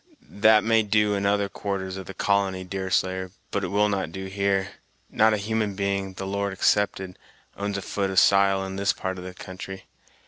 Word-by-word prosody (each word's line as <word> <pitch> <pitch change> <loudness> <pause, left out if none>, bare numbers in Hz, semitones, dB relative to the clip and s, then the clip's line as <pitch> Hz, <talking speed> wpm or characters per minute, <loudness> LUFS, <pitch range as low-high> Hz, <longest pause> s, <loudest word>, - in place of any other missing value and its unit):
"That 110 +1 +5
may 115 0 +4
do 105 0 +2
in 100 0 0
other 100 0 +2
quarters 95 -2 -4
of 95 -1 -7
the 95 - -8
colony, 95 -2 +1
Deerslayer, 95 0 -1 0.2
but 100 - -1
it - - -1
will 105 +3 +2
not 95 -5 -2
do 95 +2 -6
here. 100 0 0 0.4
Not 110 0 +4
a - - -2
human 105 0 -1
being, 100 -1 -1
the 95 +1 -6
Lord 100 0 -2
excepted, 95 -1 0 0.4
owns 100 0 -3
a 100 - -5
foot 100 -1 -2
of 95 - -4
sile 95 0 +4
in 95 0 -6
this 100 0 +2
part 95 0 -4
of - - -8
the 90 0 -8
country. 95 +1 -8
100 Hz, 200 wpm, -25 LUFS, 95-100 Hz, 0.4 s, That